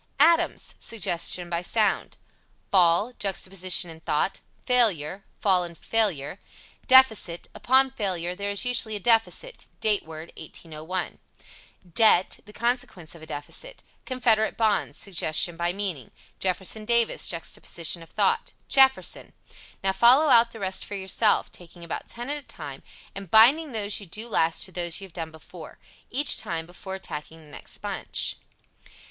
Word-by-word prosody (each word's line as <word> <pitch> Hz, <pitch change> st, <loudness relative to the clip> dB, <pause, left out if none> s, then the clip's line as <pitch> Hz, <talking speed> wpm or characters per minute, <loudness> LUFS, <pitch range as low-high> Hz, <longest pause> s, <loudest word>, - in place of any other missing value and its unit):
ADAMS 335 Hz, +3 st, +2 dB
Suggestion 175 Hz, -4 st, -2 dB
by 170 Hz, 0 st, -2 dB
sound. 210 Hz, +2 st, 0 dB, 0.5 s
Fall 185 Hz, +5 st, +4 dB
Juxtaposition 185 Hz, -3 st, 0 dB
of 160 Hz, 0 st, -13 dB
thought. 155 Hz, +5 st, -1 dB, 0.2 s
Failure 200 Hz, -, +2 dB, 0.2 s
Fall 185 Hz, -3 st, +3 dB
and 170 Hz, -1 st, -9 dB
failure. 195 Hz, -7 st, 0 dB, 0.5 s
(Deficit) 225 Hz, -10 st, +5 dB
Upon 265 Hz, +1 st, +3 dB
failure 180 Hz, -7 st, -3 dB
there 200 Hz, +2 st, -4 dB
is 200 Hz, +4 st, +2 dB
usually 235 Hz, -3 st, +1 dB
a -, -, -4 dB
deficit 230 Hz, -, +1 dB
Date 210 Hz, -2 st, +2 dB
word 160 Hz, +1 st, -10 dB
(1801). 160 Hz, +3 st, -6 dB, 0.7 s
Debt 215 Hz, -4 st, +4 dB
The 210 Hz, -, -13 dB
consequence 235 Hz, -8 st, -2 dB
of 170 Hz, -, -14 dB
a 160 Hz, -, -11 dB
deficit. -, -, -8 dB, 0.2 s
Confederate 235 Hz, -4 st, +1 dB
bonds 220 Hz, -2 st, 0 dB
Suggestion 170 Hz, -2 st, 0 dB
by 170 Hz, +1 st, -1 dB
meaning. 180 Hz, -, -4 dB, 0.3 s
Jefferson 190 Hz, +3 st, -1 dB
Davis 235 Hz, 0 st, +2 dB
Juxtaposition 170 Hz, 0 st, -2 dB
of 165 Hz, -, -14 dB
thought. -, -, +1 dB, 0.2 s
JEFFERSON. 265 Hz, -1 st, +3 dB, 0.5 s
Now 195 Hz, -, +2 dB
follow 245 Hz, +10 st, +5 dB
out 235 Hz, -2 st, +6 dB
the 225 Hz, -, -11 dB
rest 190 Hz, -1 st, -1 dB
for 205 Hz, -, -7 dB
yourself, 200 Hz, +3 st, +1 dB
taking 175 Hz, 0 st, -12 dB
about 170 Hz, -, -5 dB
ten 240 Hz, +1 st, -7 dB
at 295 Hz, -, -2 dB
a -, -, -33 dB
time, 140 Hz, -4 st, -8 dB, 0.3 s
and 195 Hz, -2 st, -9 dB
binding 270 Hz, -, +5 dB
those 210 Hz, -3 st, -1 dB
you 200 Hz, -, -11 dB
do 215 Hz, +7 st, -6 dB
last 165 Hz, -7 st, 0 dB
to 190 Hz, -, -7 dB
those 175 Hz, -1 st, -1 dB
you 195 Hz, -, -9 dB
have 185 Hz, -, -17 dB
done 165 Hz, -2 st, -6 dB
before, 160 Hz, +1 st, -13 dB, 0.3 s
each 285 Hz, +4 st, +3 dB
time, 165 Hz, -1 st, -4 dB
before 185 Hz, +2 st, -8 dB
attacking 160 Hz, -3 st, -8 dB
the 150 Hz, -2 st, -16 dB
next -, -, -9 dB
bunch. -, -, -2 dB
195 Hz, 150 wpm, -25 LUFS, 170-230 Hz, 0.7 s, out